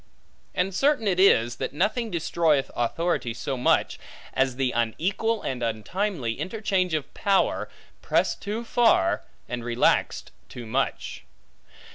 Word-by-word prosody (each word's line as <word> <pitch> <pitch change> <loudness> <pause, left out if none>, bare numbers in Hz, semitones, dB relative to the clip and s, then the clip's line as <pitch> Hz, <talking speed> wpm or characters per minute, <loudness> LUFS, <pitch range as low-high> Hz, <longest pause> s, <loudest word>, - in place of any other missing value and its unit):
And 185 +1 0
certain 275 0 +2
it 185 -2 +1
is, 120 -11 +4
that - - -4
nothing 220 - 0
destroyeth 160 -5 +1
authority 120 -1 -1
so 135 +3 -3
much, 125 - +1 0.3
as 130 -1 +1
the 130 -1 0
unequal 185 - -1
and 125 -2 -3
untimely 120 - -2
interchange 190 -4 0
of 150 - -4
power 200 -3 +1 0.3
pressed - - +1
too 215 +3 -3
far, 230 - +3 0.3
and 120 -1 -4
relaxed 120 0 +1 0.2
too 120 - -8
much. 130 +5 -2
160 Hz, 125 wpm, -25 LUFS, 120-200 Hz, 0.3 s, is